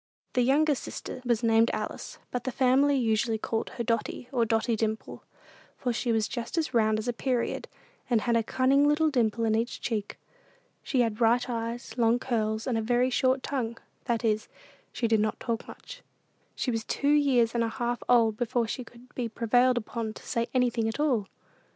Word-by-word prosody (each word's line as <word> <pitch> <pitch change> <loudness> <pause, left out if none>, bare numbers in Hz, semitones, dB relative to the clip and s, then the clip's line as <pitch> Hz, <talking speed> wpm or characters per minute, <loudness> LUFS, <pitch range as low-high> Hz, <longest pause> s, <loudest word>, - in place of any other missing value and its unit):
The 250 - +2
youngest 285 +3 +3
sister - - -7
was 240 -2 0
named 225 0 +4
Alice, - - -5
but 250 -1 -3
the 260 - -2
family 270 +3 +3
usually 225 -2 +1
called 225 +1 -2
her 235 - -1
Dotty, 230 +2 -2
or 240 -4 +2
Dotty 225 +1 +1
Dimple, 220 0 -3 0.6
for 245 -2 -1
she 240 +1 -1
was 220 -1 +2
about 240 +7 -5
as 310 -5 0
round 220 -2 +3
as 220 +2 -4
a 245 - 0
period, 245 0 -1 0.4
and 235 -3 +3
had 235 0 +1
a 230 - +4
cunning 265 +5 +3
little 305 +1 +3
dimple 230 -3 +1
in 220 - +2
each 230 +2 -1
cheek. 215 -4 -3 0.6
She 260 - +1
had 225 -3 0
bright 240 +2 +3
eyes, 230 +1 -4
long 230 0 +4
curls, 220 -3 -1
and 240 -4 0
a - - -1
very 245 +3 +2
short 260 +1 +2
tongue; 235 -5 -2 0.3
that 235 -2 -1
is, 215 -1 +1 0.4
she 235 - -1
did 220 -1 +3
not 215 +1 0
talk 230 -2 -3
much. - - -11 0.5
She 255 - -1
was 225 -1 -2
two 285 +5 0
years 260 -6 +3
and 235 -1 +1
a 225 - 0
half 240 +1 -2
old 230 -3 +4
before 240 -1 0
she 250 +3 -4
could 240 +1 -17
be 240 -2 -3
prevailed 245 +3 +2
upon 220 -1 -4
to - - -11
say 235 -1 -1
anything 240 -3 +2
at 225 - -3
all. 250 -10 +1
235 Hz, 195 wpm, -28 LUFS, 225-255 Hz, 0.6 s, named